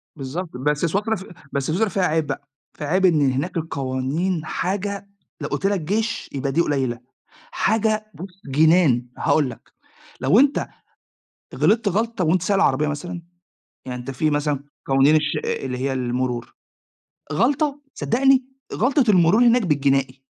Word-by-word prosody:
بالضبط 155 +5 -5
بس 150 +4 0
سويسرا 205 +6 0
ف 190 - -8 0.3
بس 140 -1 -2
سويسرا، 200 +7 +1
فيها 190 +1 -1
عيب 160 -2 +1
بقى، 135 0 -5 0.3
فيها 150 - -4
عيب 185 +4 +2
إن 150 -6 +4
هناك 145 +8 -2
القوانين 155 +3 -2
حاجة 200 +4 -3 0.3
لو - - -2
قلت - - -3
لك 200 -1 +2
جيش 215 +8 -2
يبقى 135 0 -2
دي 165 - +2
قليلة، 130 -7 -1 0.5
حاجة 215 0 +1
بُص 180 +4 -11
جنان. 145 -3 +3
هاقول 145 -4 +2
لك، 120 - -10 0.6
لو 135 - +4
أنت 280 +1 +3 0.9
غلطت 220 0 +2
غلطة 220 +1 -1
وانت 175 +3 +2
سايق 200 +3 +1
العربية 150 -4 +2
مثلًا، 170 +4 -5 0.7
يعني 125 -1 -4
أنت 120 - -6
في 155 +4 0
مثلًا 145 -1 -1 0.2
قوانين 135 +3 +4
الش 150 -1 0
أأ - - -2
اللي 125 -1 -3
هي 135 +1 -1
المرور، 125 -1 -2 0.8
غلطة، 280 - +1
صدقني 265 +2 +2 0.3
غلطة 255 +3 +2
المرور 185 +6 +5
هناك 240 +1 +5
بالجنائي. 135 -4 +1
160 Hz, 150 wpm, -22 LUFS, 135-200 Hz, 0.9 s, المرور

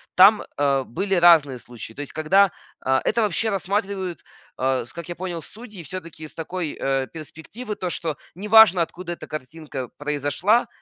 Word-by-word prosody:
там, 200 +3 +7
э, 140 -2 +2
были 195 +11 -2
разные 165 -7 +6
случаи. 115 -1 -10
То - - -14
есть, 145 - -7
когда, 185 +5 +4 0.3
э, 130 0 +3
это 235 - +1
вообще 210 +3 +1
рассматривают, 195 -2 -2 0.3
э, 130 -1 0
с - - -13
как 170 0 -8
я 175 - -4
понял, 175 -2 -4
судьи 210 0 -11
всё-таки 165 -2 -8
с - - -15
такой, 165 -1 -4
э, 135 -1 0
перспективы, 165 - -8
то, 185 - -3
что 165 -3 -2 0.2
не 200 +4 -6
важно 215 -4 +8
откуда 175 +1 -4
эта - - -10
картинка 150 -3 -6
произошла, 145 - +1
170 Hz, 170 wpm, -23 LUFS, 145-195 Hz, 0.3 s, важно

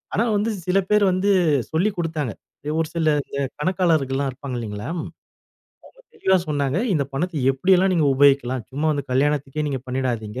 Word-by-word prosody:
ஆனா, 225 - +2
வந்து 215 +3 0 0.2
சில 190 +2 +3
பேர் 210 -1 +4
வந்து 190 +3 +1 0.4
சொல்லிக் 185 +5 0
கொடுத்தாங்க. 155 -7 -2 0.5
ஒரு 160 - 0
சில 160 -1 0 0.2
இந்த 140 - -5 0.2
கணக்காளர்கள்லாம் 150 -6 +1
இருப்பாங்க 130 0 -7
இல்லைங்களா. 105 -1 -5
அவங்க 170 - -8 0.9
தெளிவா 190 - +2
சொன்னாங்க. 145 +1 0 0.2
இந்த 140 -3 +1
பணத்தை 160 +3 -2
எப்படியெல்லாம் 185 +6 +3
நீங்க 155 -4 +2
உபயோகிக்கலாம். 130 -3 +3
சும்மா 145 +4 -2
வந்து 145 -2 -3
கல்யாணத்திக்கே 145 +2 0
நீங்க 135 -3 -3
பண்ணிடாதீங்க. 125 -3 -3
145 Hz, 150 wpm, -22 LUFS, 135-180 Hz, 0.9 s, பேர்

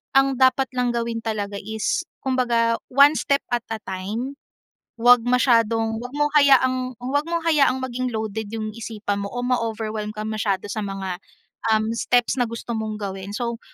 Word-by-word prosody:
ang 270 0 +4
dapat 260 0 +4
lang 250 -1 +1
gawin 230 -1 -2
talaga 205 -2 -3
is 220 - -2 0.2
kumbaga, 240 -3 +2
one 280 +3 +6
step 280 0 +1
at 240 -1 0
a 225 -1 -3
time. 215 +9 -4 0.6
‘Wag 245 0 +6
masyadong 230 -3 +2
‘wag 250 +1 -8
mong 295 0 +2
hayaang 255 -2 +3
‘wag 275 +4 -1
mong 335 -1 -1
hayaang 285 -5 +3
maging 255 0 -2
loaded 220 0 -3
yung 215 -1 -3
isipan 210 -3 -3
mo - - -3
o 245 - -2
ma-overwhelm 220 -3 -2
kang 215 0 -4
masyado 205 -2 -1
sa 215 - -3
mga, 190 -2 -4 0.6
um, 215 0 0
steps 245 +2 +1
na 245 - +3
gusto 230 +1 -6
mong 220 -1 -3
gawin. 195 0 -5
So, 235 -1 -3
230 Hz, 165 wpm, -23 LUFS, 215-255 Hz, 0.6 s, one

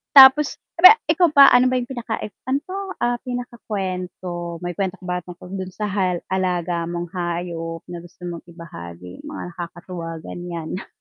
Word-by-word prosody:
Tapos 270 +2 +9 0.2
re 370 +5 +11 0.2
ikaw 345 +2 +4
ba 280 -1 +10
ano 250 +1 +6
ba 255 - +1
yung 250 0 -2
pinaka 240 -3 -3
i 210 - -5 0.2
ano 275 +2 0
'to, 370 - -7 0.3
ah, 240 0 +1
pinakakwento 185 -8 -4
may 175 - -2
kwento 190 +2 -2
ka 190 - -21
ba 180 0 -2
tungkol 180 +1 -11
dun 185 0 -5
sa 210 - -2
hal 185 -3 0
alaga 175 -2 0
mong 175 0 -4
hayop 170 -2 -4
na 175 - -5
gusto 175 +1 -16
mong 170 -1 -5
ibahagi 90 - -10
mga - - -6
nakakatuwa 170 -1 -7
ganyan? 175 0 -6
180 Hz, 170 wpm, -22 LUFS, 170-235 Hz, 0.3 s, re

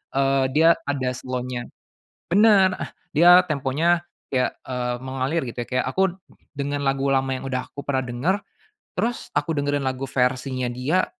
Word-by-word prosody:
eee, 135 0 +3
dia 160 +2 +6 0.2
ada 135 -3 0
slow-nya 125 -1 -4 0.6
bener, 200 -2 +5
eh, - - -4 0.2
dia 175 +4 +8
temponya 155 +3 +1 0.3
kayak, 130 -1 0
eee, 125 -1 -2
mengalir 135 +5 -1
gitu 120 0 -6
ya - - -28
kayak 130 0 0
aku 190 +4 +1 0.4
dengan 145 0 -2
lagu 135 0 +1
lama 135 0 +1
yang 130 +1 -5
udah 130 -1 -3
aku 140 - -7
pernah 130 -2 0
denger, 125 +11 0 0.6
terus 230 +5 -2
aku 165 - 0
dengerin 145 -1 0
lagu 130 +1 -3
versinya 130 0 0
dia, 130 +9 +1
135 Hz, 155 wpm, -23 LUFS, 130-165 Hz, 0.6 s, dia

